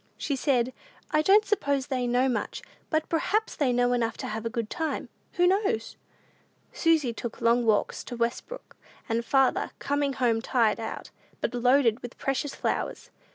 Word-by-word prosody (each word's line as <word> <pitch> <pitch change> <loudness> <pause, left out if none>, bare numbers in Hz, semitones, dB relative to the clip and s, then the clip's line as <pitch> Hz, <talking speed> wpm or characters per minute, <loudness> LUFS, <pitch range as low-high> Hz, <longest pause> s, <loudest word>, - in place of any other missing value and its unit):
She 285 - -1
said, 255 -2 +1 0.4
"I 305 - +3
don't 405 +6 +5
suppose 285 -10 0
they 255 -3 -1
know 250 +2 +2
much, 250 - -2 0.3
but 315 -1 0
perhaps 415 +7 0
they 275 -4 +1
know 245 0 +2
enough 230 -2 0
to - - -5
have 220 +1 -3
a - - -2
good 230 -2 -3
time: 320 +6 -3 0.2
who 355 - +3
knows?" 370 - +1 0.8
Susy 315 -7 +2
took 235 0 -6
long 235 0 +3
walks 215 -2 +1
to 245 - -6
Westbrook, 235 - -4 0.3
and 230 0 0
farther, 270 +1 +2
coming 285 0 0
home 235 -3 +1
tired 230 -3 +2
out, 225 -1 -6 0.3
but - - -2
loaded 245 -1 +3
with 245 - -9
precious 270 +1 -2
flowers. - - -3
255 Hz, 165 wpm, -27 LUFS, 235-295 Hz, 0.8 s, don't